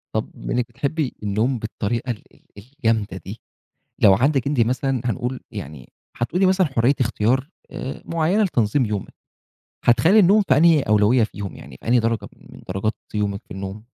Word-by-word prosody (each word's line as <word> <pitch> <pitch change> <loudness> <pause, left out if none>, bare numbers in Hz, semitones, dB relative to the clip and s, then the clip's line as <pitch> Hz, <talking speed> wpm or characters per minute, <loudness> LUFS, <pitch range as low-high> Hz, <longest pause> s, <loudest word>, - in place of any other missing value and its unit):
طب - - -1
بما - - -5
إنِك 125 -1 +1
بتحبي 145 -1 -2
النوم 110 +5 0
بالطريقة 115 +2 -3
ال 110 - -7
ال - - -24 0.2
الجامدة 110 -4 -2
دي، 100 +4 -8 0.6
لو 100 -2 +8
عندِك 135 +5 +1
أنتِ 140 -3 +1
مثلًا 130 +2 +1
هنقول 125 +3 -2
يعني 70 -3 -9 0.2
حتقولي 180 +11 +1
مثلًا 185 -1 +3
حرية 130 0 +2
اختيار 125 +3 +1 0.2
آآ، 130 - -6
معينة 170 +6 +1
لتنظيم 125 - +1
يومِك، 105 -2 -4 0.7
هتخلِّي 160 - +5
النوم 205 +2 +6
في 130 - +5
أنهي 165 -1 +5
أولوية 105 +2 +3
فيهم؟ 100 -2 -6
يعني 65 -1 -12
في - - -9
أنهي 120 0 +5
درجة 115 0 -1
من - - -15
درجات 95 +4 -1 0.2
يومِك 100 -1 -1
في - - -8
النوم؟ 100 +3 -7
120 Hz, 165 wpm, -22 LUFS, 105-140 Hz, 0.7 s, لو